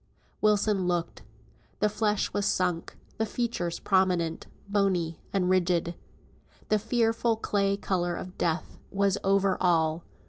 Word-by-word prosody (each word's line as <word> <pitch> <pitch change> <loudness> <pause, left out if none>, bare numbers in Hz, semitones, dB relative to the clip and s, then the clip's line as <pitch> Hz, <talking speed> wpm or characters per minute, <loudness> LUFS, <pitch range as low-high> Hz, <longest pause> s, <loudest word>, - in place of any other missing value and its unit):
Wilson 210 -3 +2
looked. 175 -2 -2 0.6
The 210 - +3
flesh 210 0 0
was 205 0 0
sunk, 180 -4 -1 0.2
the 220 - +2
features 205 -8 -2
prominent, 180 -4 +1 0.2
bony, 190 -5 0
and 190 -2 +1
rigid. 175 -2 +2 0.8
The 215 - +3
fearful 225 +1 +1
clay 200 -2 0
colour 175 -3 -1
of 185 +1 -7
death 165 0 -2
was 200 0 +1
over 195 0 +2
all. 165 -2 +2
190 Hz, 125 wpm, -28 LUFS, 175-210 Hz, 0.8 s, The